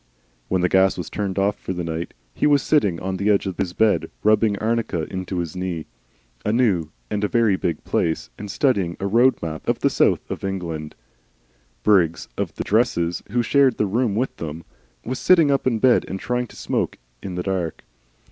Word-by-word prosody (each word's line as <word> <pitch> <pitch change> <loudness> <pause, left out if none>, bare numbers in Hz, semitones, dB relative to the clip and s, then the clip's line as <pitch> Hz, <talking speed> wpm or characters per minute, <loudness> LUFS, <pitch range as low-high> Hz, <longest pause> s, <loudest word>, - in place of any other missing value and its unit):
When 95 -1 +1
the 90 - +3
gas 95 +1 +3
was 90 - -5
turned 100 -2 -3
off 100 +1 +2
for 95 - -4
the 90 -1 -3
night 80 +1 -4 0.2
he - - +1
was 145 -2 +4
sitting 100 - +2
on 95 0 -3
the 100 +3 0
edge 100 -1 +3
of 95 -3 -4
his 90 - -1
bed, 110 +1 +2
rubbing 105 -1 +3
arnica 110 -6 -1
into 95 0 -3
his 85 -2 -3
knee 90 -3 -3 0.6
a 105 - 0
new 105 -10 +2 0.2
and 105 0 -1
very 115 -2 +3
big 85 -2 -2
place 80 -1 -1
and 105 - -8
studying 100 -6 +1
a 100 - -3
Road 120 +6 +4
Map 80 -1 -5
of - - +2
the - - +1
South - - +3
of - - -5
England. 85 -6 -4 0.9
Briggs 90 -6 +3
of - - -3
the - - -3
"dresses," 90 -7 +1
who 120 +3 +1
shared 135 0 +3
the 105 - +2
room 110 +1 0
with 125 +4 -2
him, 80 +1 -5 0.4
was 130 +2 -3
sitting 165 -6 +5
up 135 -1 +1
in 120 -3 +2
bed 125 +2 +4
and 95 - -4
trying 125 +2 -1
to - - -16
smoke - - -2 0.2
in 95 -2 -6
the 90 - -2
dark. 90 -4 -2
100 Hz, 200 wpm, -22 LUFS, 90-115 Hz, 0.9 s, sitting